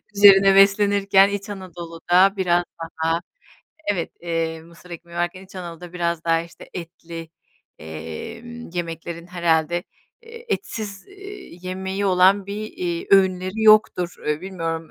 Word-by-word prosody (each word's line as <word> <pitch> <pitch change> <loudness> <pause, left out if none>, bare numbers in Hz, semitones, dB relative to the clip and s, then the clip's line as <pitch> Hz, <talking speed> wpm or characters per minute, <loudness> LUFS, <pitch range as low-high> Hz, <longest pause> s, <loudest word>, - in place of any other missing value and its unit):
üzerine 195 -1 +8
beslenirken, 195 0 +5
İç 205 +1 -4
Anadolu'da 180 0 +1
biraz 175 -2 +2 0.2
daha 165 +1 -1 0.7
evet, 175 -4 -3
eee, 165 -1 -2
mısır 170 +2 -17
ekmeği 170 0 -10
varken, 175 +2 -2
İç 190 - -18
Anadolu'da 175 -1 -8
biraz 170 -2 -2
daha, 165 0 +3
işte, 170 - -14
etli, 170 -1 -8 0.5
emm, 220 - -8
yemeklerin 170 -1 -5
herhâlde, 175 -1 +1 0.4
eee, 465 +1 -12
etsiz, 210 - -4
eee, 395 - -11
yemeği 190 +2 -3
olan 190 +2 +4
bir, 200 +1 -5 0.2
iii, 170 -2 -3
öğünleri 190 +2 +3
yoktur. 210 -5 +5
E, 150 0 0
bilmiyorum, 165 -3 -4
180 Hz, 125 wpm, -22 LUFS, 170-195 Hz, 0.7 s, üzerine